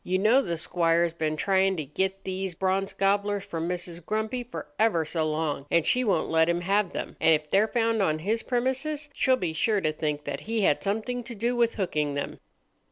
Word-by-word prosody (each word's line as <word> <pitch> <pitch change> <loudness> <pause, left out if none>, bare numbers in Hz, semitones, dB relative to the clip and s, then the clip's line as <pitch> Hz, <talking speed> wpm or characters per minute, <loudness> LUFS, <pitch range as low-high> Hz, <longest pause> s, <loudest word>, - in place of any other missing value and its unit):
You 185 +1 0
know, 220 +7 +4
the 170 -10 -3
squire's 170 0 +1
been 155 -2 -2
trying 190 +1 +2
to 155 - -3
get 190 +7 -2
these 190 -1 -4
Bronze 190 +2 0
Gobblers 200 0 0
from 165 +1 -3
Mrs. 175 -1 -4
Grumpy 220 +6 -2
for 170 -10 -7
ever 210 -8 +3
so 155 0 -1
long, 155 -2 -2
and 170 -2 +2
she 250 - +3
won't 195 -8 +1
let 160 0 +3
him 170 0 +1
have 195 +1 +1
them; - - -5
and 160 - +6
if 150 0 -6
they're 205 +3 +4
found 225 -2 +1
on 155 -5 +2
his 210 +8 -1
premises, 270 +4 -1
she'll 260 -2 +3
be 175 -7 -2
sure 205 +6 +1
to 155 -4 0
think 150 -1 -2
that - - -4
he 225 -1 0
had 150 - +2
something 225 +5 -2
to 235 -1 -7
do 235 +4 -1
with 235 -1 +2
hooking 150 -8 -1
them." 145 - -4
190 Hz, 215 wpm, -27 LUFS, 160-220 Hz, -, and